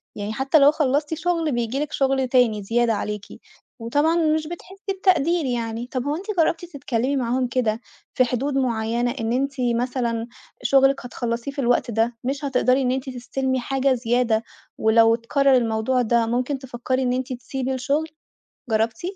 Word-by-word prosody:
يعني 205 +1 -4
حتى 270 +6 +3
لو 280 +1 +7
خلّصتِ 295 0 0
شغل 330 -1 0
بييجي 240 +1 -1
لِك 300 0 -3
شغل 270 -1 +1
تاني 245 -5 +2
زيادة 230 +2 +1
عليكِ، 210 0 -4 0.5
وطبعًا 290 +8 +1
مش 315 -2 +1
بتحسّي 385 +4 -7
بتقدير 345 -3 +2
يعني، 235 -1 -3
طب 255 -1 -3
هو 290 +2 -1
أنتِ 365 +5 -7
جرّبتِ 330 +1 +1
تتكلمي 280 -5 -2
معاهم 250 0 0
كده 235 -2 -1 0.3
في 255 - +4
حدود 255 +4 -2
معيّنة 235 -1 0
إن 225 +1 -1
أنتِ 275 +2 0 0.2
مثلًا 235 -2 -1 0.4
شغلِك 270 -1 +3
هتخلّصيه 240 +1 -3
في 280 - -8
الوقت 245 -2 +1
ده 230 +2 0
مش 275 +3 -2
هتقدري 260 0 +2
إن 250 - +1
أنتِ 265 +1 -3
تستلّمي 260 +1 -2
حاجة 270 +1 +1
زيادة، 235 -2 +1 0.3
ولو 225 +1 +5
اتكرر 270 +3 +2
الموضوع 235 +1 +1
ده 235 0 +2
ممكن 250 +4 -1
تفكّري 255 0 -3
إن 250 -1 +1
أنتِ 255 0 -2
تسيبي 260 +1 -4
الشغل، 280 +5 -1 0.6
جرّبتِ؟ 225 0 0
255 Hz, 165 wpm, -23 LUFS, 235-275 Hz, 0.6 s, لو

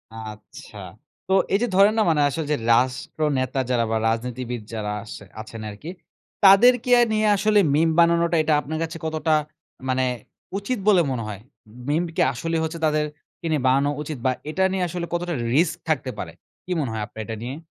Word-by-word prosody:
আচ্ছা। 110 -1 -10 0.5
তো 190 - +1 0.2
এই 195 - +4
যে 245 - +2
ধরেন 200 +2 +6
না - - +4
মানে 155 -2 +2
আসলে 160 +2 -3
যে 150 - +2 0.2
রাষ্ট্রনেতা 130 +2 0
যারা 120 -2 +2
বা 110 - +2
রাজনীতিবিদ 120 +1 -3
যারা 105 -2 -3
আসে 105 -2 -10 0.2
আছেন 110 0 -9
আরকি, 105 +11 -9 0.6
তাদেরকে 245 +6 +6 0.2
নিয়ে 215 0 +2
আসলে 210 +1 +3
meme 160 +2 +3
বানানোটা 170 0 +4
এটা 155 0 +2
আপনার 155 +2 -5
কাছে 165 0 -5
কতটা 160 0 0 0.6
মানে 130 0 +1 0.5
উচিত 210 +4 -3
বলে 195 -4 +6
মনে 120 -3 -2
হয়? 100 -2 -7 0.5
Meme 160 +4 +1
কি - - +1
আসলেই 165 +6 -2
হচ্ছে 160 +1 -4
তাদেরকে 150 +1 -3
নিয়ে 150 -3 +1
বানানো 135 +2 +3
উচিত 150 -1 -5
বা 130 - +4 0.2
এটা 190 +5 0
নিয়ে 190 -1 -1
আসলে 170 0 -4
কতটা 175 0 -1 0.2
risk 160 +3 +3
থাকতে 135 -4 0
পারে? 80 - -5 0.3
কি 185 - -7
মনে 135 -6 -2
হয় 110 - -3
আপনার 110 - -8
এটা 115 - -5
নিয়ে? 125 +4 -5
150 Hz, 180 wpm, -23 LUFS, 125-170 Hz, 0.6 s, ধরেন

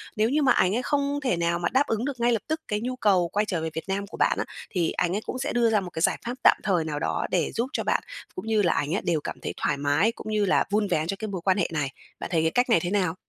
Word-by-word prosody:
Nếu 215 +1 +2
như 300 +4 +2
mà 265 -3 +4
ảnh 185 +3 +3
ấy 245 - 0
không 285 +1 0
thể 185 -10 +1
nào 170 0 0
mà 170 - 0
đáp 265 +2 +3
ứng 225 +2 -1
được 270 -4 -4
ngay 240 +1 +3
lập 225 -3 +1
tức 315 +1 -2
cái 210 0 -1
nhu 255 +2 -3
cầu 195 -7 +3
quay 210 +1 +2
trở 175 -5 -2
về 160 - -2
Việt 160 - -4
Nam 200 +1 -1
của - - -10
bạn - - +2
á, - - -1 0.2
thì 175 -3 0
anh 180 +1 0
ấy 210 - -1
cũng 255 - -4
sẽ 265 - -2
đưa 235 -1 +3
ra 215 - +3
một 185 - -6
cái 160 - -5
giải - - +3
pháp 240 - -2
tạm - - +7
thời 180 -5 +1
nào 150 -2 -3
đó - - -1
để 175 -4 +1
giúp 235 +2 -1
cho - - -1
bạn - - +1 0.3
cũng 295 - -6
như 220 -2 +3
là 175 - +3
ảnh 150 +5 -1
ấy - - -1
đều 160 -4 0
cảm - - -6
thấy - - -4
thoải 145 - 0
mái, 145 +10 +2
cũng - - -11
như 210 -1 +2
là 190 - +3
vun 210 0 +2
vén 155 -2 0
cho 195 - -1
cái 220 - -3
mối 190 -4 -4
quan 190 +2 +2
hệ 175 - +1
này. 145 -3 -1 0.3
Bạn - - -5
thấy 160 - +3
cái 160 0 +1
cách 245 +4 +2
này 230 - +5
thế 175 - -3
nào? 185 -5 +1
200 Hz, 330 wpm, -26 LUFS, 170-235 Hz, 0.3 s, tạm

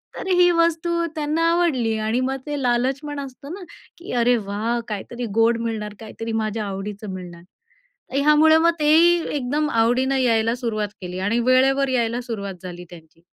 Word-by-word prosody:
तर - - -6
ही 360 -1 +5
वस्तू 335 0 +1
त्यांना 305 +1 -1
आवडली. 265 -11 +1
आणि 220 +3 0
मग 265 +1 -1
ते 290 -1 -3
लालचपण 265 +4 -1
असतं 275 +3 -9
ना, 390 0 -8 0.3
की 345 - -9
"अरे 245 +1 +4
वाह! 220 +4 -1
काहीतरी 235 +4 -5
गोड 230 +1 +4
मिळणार, 220 -2 -4
काहीतरी 225 +1 -6
माझ्या 215 0 -3
आवडीचं 200 +1 -6
मिळणार." 175 -2 -9 0.7
ह्यामुळं 300 +2 +5
मग 335 - +5
तेही 330 +3 +5 0.2
एकदम 290 +3 -1
आवडीनं 245 +4 +2
यायला 230 -2 +2
सुरुवात 215 -2 -1
केली 180 0 -6
आणि 230 +3 +1
वेळेवर 270 +2 +3
यायला 240 -2 0
सुरुवात 205 -5 -5
झाली 180 -1 -8
त्यांची. 165 -1 -16
245 Hz, 155 wpm, -22 LUFS, 215-295 Hz, 0.7 s, ही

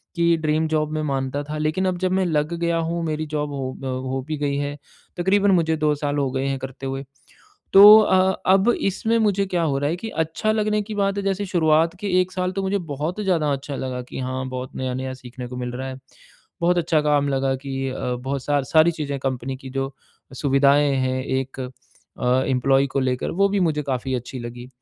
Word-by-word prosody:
कि 170 0 +3
dream 155 +1 +1
job 155 -1 0
मैं 155 0 -1
मानता 135 0 -2
था 150 +1 -5
लेकिन 155 +5 0
अब 185 -1 0
जब 185 0 0
मैं 190 0 +2
लग 155 0 0
गया 170 0 +1
हूँ 170 0 -2
मेरी 155 0 -2
जॉब 150 0 -1
हो 135 -2 -3
अ, - - -4
हो 130 +1 -3
भी 155 -1 -3
गई 140 -1 -1
है, 145 0 -3 0.4
तकरीबन 195 +3 +3
मुझे 160 -3 +2
2 150 -1 +2
साल 145 0 -2
हो 140 -2 +1
गए 135 0 -2
हैं 135 -1 -1
करते 135 0 -7
हुए। 135 +1 -4 0.7
तो 205 +2 +11
अ, 190 -2 +4
अब 195 +4 +4
इसमें 220 +4 0
मुझे 200 -2 +2
क्या 180 -2 -1
हो 140 -4 +1
रहा 145 +1 0
है 170 - 0
कि 225 +5 -6
अच्छा 165 +7 -1
लगने 215 -1 +1
की 210 +1 -6
बात 200 0 0
है 200 - -2
जैसे 195 +1 -1
शुरुआत 165 -1 +2
के 205 - -4
1 185 0 -3
साल 180 0 -1
तो - - +1
मुझे 195 +1 0 0.2
बहुत 160 +9 -3
ज़्यादा 165 -7 +1
अच्छा 140 +1 -5
लगा 130 -1 -4
कि - - -6
हाँ, 130 0 -3
बहुत 130 0 -6
नया-नया 130 0 -3
सीखने 125 -1 -9
को 125 - -8
मिल 125 -1 -4
रहा 130 +2 -5
है, 130 0 -6 0.6
बहुत 175 +1 +3
अच्छा 160 -2 +2
काम 145 -1 +2
लगा 135 -1 0
कि 135 0 -4
अ, 130 - -5 0.2
बहुत 135 +2 -4
सार 145 -2 +1
सारी 160 +4 +4
चीजें 145 -3 -4
कंपनी 130 0 -3
की 130 0 -10
जो 135 +1 -3 0.4
सुविधाएँ 140 +1 +3
हैं 130 0 0
एक 130 0 -3
अ, 125 - -5 0.8
एम्प्लॉयी 135 +1 +2
को 135 - -1
लेकर, 130 -1 -1
वो 200 +3 +2
भी 200 0 0
मुझे 155 -4 +1
काफ़ी 130 -1 -2
अच्छी 125 +1 -6
लगी। 120 +1 -8
145 Hz, 220 wpm, -22 LUFS, 135-175 Hz, 0.8 s, तो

